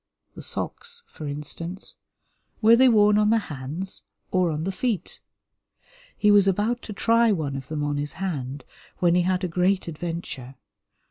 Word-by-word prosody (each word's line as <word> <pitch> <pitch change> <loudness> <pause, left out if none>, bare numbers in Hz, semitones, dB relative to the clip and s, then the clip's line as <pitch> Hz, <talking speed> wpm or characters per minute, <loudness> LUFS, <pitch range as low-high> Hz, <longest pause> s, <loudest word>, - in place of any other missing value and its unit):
The - - -9
socks, 470 0 -4
for 155 - -8
instance, 165 +6 -6 0.6
were 225 +1 +7
they 260 +2 +6
worn 210 -2 +5
on 210 0 +3
the 225 - +4
hands 160 +1 -5 0.3
or 185 -2 +2
on 155 0 -2
the 190 - -1
feet? 200 -2 -3 1.0
He 210 - +4
was 200 -1 +6
about 210 +6 +1
to - - -3
try 230 +2 +3
one 155 -8 -1
of 135 -1 -6
them 150 0 -3
on 145 0 -1
his 145 0 -3
hand, 145 -7 -4 0.3
when 175 -1 +3
he 180 - +4
had 185 +1 0
a - - +1
great 180 +2 +1
adventure. 155 -5 -6
180 Hz, 165 wpm, -25 LUFS, 150-210 Hz, 1.0 s, were